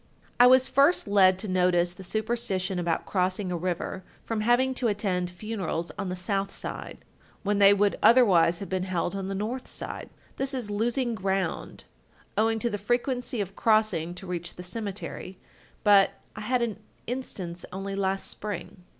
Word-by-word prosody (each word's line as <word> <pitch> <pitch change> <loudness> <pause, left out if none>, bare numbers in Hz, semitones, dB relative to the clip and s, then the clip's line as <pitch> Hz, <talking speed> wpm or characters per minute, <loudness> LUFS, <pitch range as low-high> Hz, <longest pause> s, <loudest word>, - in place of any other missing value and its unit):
"I 245 - +9
was 260 +1 +6
first 280 +2 +3
led 190 -2 +5
to 210 - -4
notice 180 -2 +2
the 190 - -11
superstition 200 -3 -1
about 170 -2 -1
crossing 185 0 0
a - - -1
river, 180 +2 -3 0.2
from 225 -2 -2
having 245 +4 +3
to 255 -1 0
attend 195 -4 -1
funerals 180 -3 -4
on 200 -2 -4
the 180 - -3
south 195 +2 -1
side, - - -7 0.4
when 205 0 +1
they 200 0 +8
would 205 0 +2
otherwise 200 -8 +6
have 200 - -5
been 185 -1 -1
held 185 0 -2
on 195 -1 -3
the 195 - -3
north 230 +6 -3
side. - - -5 0.3
This 270 0 0
is 235 -5 -3
losing 235 +4 0
ground, 190 -2 -2 0.5
owing 225 +1 +2
to 235 +2 0
the 205 - -3
frequency 245 +2 -1
of 195 0 -5
crossing 215 -7 +2
to 185 - -9
reach 175 -1 -5
the 180 - -8
cemetery, 195 -1 -6 0.5
but 200 -2 +5 0.2
I 215 - -6
had 245 +3 +1
an 220 -3 -3 0.3
instance 190 -9 -5
only 195 +1 -5
last 195 0 -1
spring." 190 -3 -7
200 Hz, 170 wpm, -27 LUFS, 185-225 Hz, 0.5 s, I